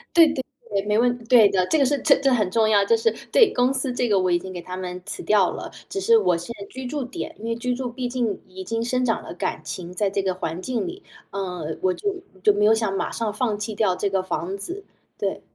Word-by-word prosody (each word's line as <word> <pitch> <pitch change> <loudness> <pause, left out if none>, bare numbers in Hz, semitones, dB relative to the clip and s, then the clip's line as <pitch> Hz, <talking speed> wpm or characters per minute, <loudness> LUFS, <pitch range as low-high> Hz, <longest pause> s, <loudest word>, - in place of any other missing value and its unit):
对 330 -2 +8
对 270 -3 -2 0.3
对， 200 -1 -1
没 210 0 +2
问 245 +1 +3
题 235 - -15
对 225 -4 +7
的， 185 -1 +2
这 320 - +2
个 280 - +4
是 285 +2 +2
这 290 - +6
这 270 -1 +3
很 210 -6 +2
重 220 +1 +3
要， 205 -2 +5
这 - - +4
是 455 0 +2 0.2
对 450 -5 +6
公 250 +2 +2
司 270 -1 0
这 245 0 0
个 205 -3 +3
我 185 -1 +1
已 175 - +4
经 185 +1 -8
给 175 - -6
他 180 +2 -7
们 180 0 -5
辞 - - -5
掉 205 -4 +4
了， - - -7 0.2
只 195 - -3
是 230 +4 +5
我 180 -4 +2
现 175 +8 -6
在 200 - -6
居 260 0 -8
住 280 +2 -3
点， 335 - -6
因 220 - -8
为 230 0 -1
居 250 +2 -1
住 250 -1 -4
毕 250 +1 -3
竟 240 -4 -1
已 190 0 -8
经 225 +4 -2
生 255 +1 0
长 225 -2 0
了 - - -8
感 - - -3
情 175 -1 -6
在 200 +1 +1
这 195 - 0
个 190 -1 0
环 170 -1 -4
境 245 +2 -2
里， 370 +3 -7 0.3
呃， 180 -5 -4
我 185 - +3
就 405 - -2 0.3
就 210 - +6
没 210 +1 +2
有 220 - +6
想 220 -3 0
马 - - -2
上 220 -3 -2
放 220 -3 0
弃 215 +1 -4
掉 200 -4 +2
这 200 +2 -1
个 190 -1 +1
房 185 +1 -3
子。 360 - -6 0.3
对。 - - -2
215 Hz, 295 characters per minute, -24 LUFS, 190-250 Hz, 0.3 s, 对